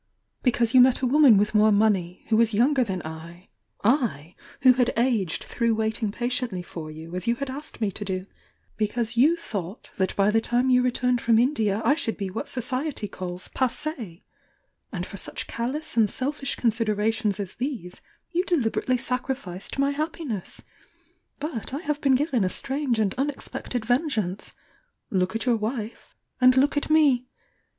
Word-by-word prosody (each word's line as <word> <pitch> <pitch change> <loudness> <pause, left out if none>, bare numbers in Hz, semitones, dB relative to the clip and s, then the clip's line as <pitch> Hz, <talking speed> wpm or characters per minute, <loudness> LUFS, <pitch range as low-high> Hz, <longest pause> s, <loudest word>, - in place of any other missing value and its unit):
Because 240 -2 +1
you 255 - +8
met 255 0 +4
a - - +1
woman 265 -4 +6
with 210 +2 +1
more 215 0 +5
money, 200 -4 +1
who 220 - +3
was 225 -1 +3
younger 260 +4 +3
than 190 -6 -4
I 165 +3 -9 0.2
— - - -37
I, 210 - +1 0.3
who 255 -1 +8
had 250 -1 +2
aged 230 -8 +1
through 230 -2 0
waiting 220 0 -1
patiently 240 -5 -2
for 165 -3 -8
you, 160 +3 -9
as 180 +3 -5
you 235 - +3
had 280 +1 -4
asked 290 +3 -8
me 215 -3 0
to 205 - -6
do 185 -1 -3 0.3
— - - -40
because 225 +2 -1
you 290 +8 +5
thought 200 - -6
that 190 -2 0
by 200 +1 +3
the 225 +1 +3
time 245 +3 +1
you 250 0 +5
returned 250 -1 +1
from 230 -1 +4
Indi* 235 -4 +2
I 220 +7 +2
should 230 -7 -2
be 195 -2 -4
what 205 - -4
Society 255 -1 -2
calls 180 -1 -5
passed 260 +2 -1 1.1
And 180 -6 -3
for 200 - -9
such - - -5
callous 260 +6 -3
and 220 -3 +4
selfish 275 +2 -2
considerations 215 -2 0
as 195 -2 -4
these 240 - -5 0.3
you 355 0 +1
de 355 -3 +2
liberately 250 0 0
sacrificed 250 -7 -4
my 275 +1 +2
happiness! 295 - -3 0.8
But 275 -4 -4
I - - -2
have 300 -2 -2
been 270 -2 +4
given 260 -5 +1
a 185 - +1
strange 270 +2 -1
and 210 -3 +1
unexpected 265 -4 -3
vengeance! 230 - -1 0.3
— - - -45
look 185 +1 0
at 225 - -2
your 240 -2 +3
wife 220 +1 -5 0.3
and 255 0 +6
look 280 +3 +3
at 290 - -1
me! 285 -6 +4
235 Hz, 180 wpm, -25 LUFS, 205-260 Hz, 1.1 s, you